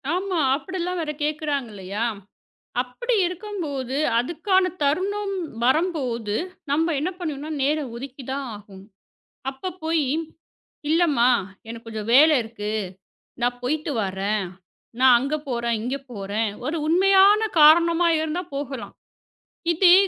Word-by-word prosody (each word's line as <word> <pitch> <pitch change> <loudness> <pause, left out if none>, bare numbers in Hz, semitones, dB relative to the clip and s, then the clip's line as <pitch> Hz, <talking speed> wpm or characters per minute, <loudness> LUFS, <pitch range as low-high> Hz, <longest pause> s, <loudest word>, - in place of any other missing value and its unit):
ஆமா. 370 -2 -1 0.2
அப்டிலாம் 360 +4 -3
வேற 300 - -2
கேக்குறாங்க 295 -4 -1
இல்லையா? 200 +3 -3 0.8
அப்படி 460 - -3
இருக்கும்போது 325 - -4 0.2
அதுக்கான 365 - +1
தருணம் 395 +7 0 0.3
வரம்போது 255 - 0 0.4
நம்ம 320 +3 +2
என்ன 350 +5 -1
பண்ணனுனா 305 -2 -4
நேரம் 285 -3 0
ஒதுக்கிதான் 270 +1 -5
ஆகணும். 200 -1 -13 0.6
அப்பப் 360 +7 -7
போயி 320 -4 +1 0.8
இல்லம்மா 305 -7 +3 0.4
எனக்குக் 230 0 -8
கொஞ்சம் 220 -1 -5
வேல 305 +5 +8
இருக்கு. 215 -2 -6 0.7
நான் 245 0 0
போயிட்டு 300 +4 -1
வரேன். 195 +2 -1 0.6
நான் 255 -2 +7
அங்க 275 +5 -2
போறேன். 235 -2 0
இங்க 255 +3 -2 0.2
போறேன். 210 +1 -2 0.2
ஒரு 330 - -1
உண்மையான 390 +5 +5 0.2
காரணமா 335 +3 +6
இருந்தா 315 +3 -2
போகலாம். 275 -3 -5 0.8
இதே 350 +1 +6
290 Hz, 110 wpm, -24 LUFS, 240-345 Hz, 0.8 s, வேல